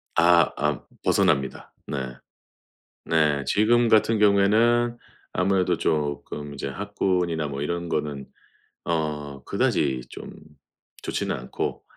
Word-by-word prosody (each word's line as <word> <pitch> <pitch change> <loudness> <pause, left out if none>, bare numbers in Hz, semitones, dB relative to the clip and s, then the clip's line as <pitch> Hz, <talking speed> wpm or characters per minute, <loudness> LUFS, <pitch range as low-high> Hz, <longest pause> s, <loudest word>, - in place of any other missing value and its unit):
아, 85 0 +5
아 75 -1 -1 0.2
벗어납니다. 70 -1 +1
네. 65 -3 -4 0.9
네, 75 -3 +2
지금 120 +3 +3
같은 110 0 +4
경우에는 110 +4 +3 0.4
아무래도 90 -2 +1
쪼끔 75 -1 -2
이제 70 - -5
학군이나 90 -2 -1
뭐 70 -1 -5
이런 85 +3 -3
거는 75 -3 -2 0.6
어 75 -4 -3
그다지 65 -3 0
좀 - - -9 0.7
좋지는 - - -2
않고, 65 0 -4
80 Hz, 220 characters per minute, -25 LUFS, 70-100 Hz, 0.9 s, 아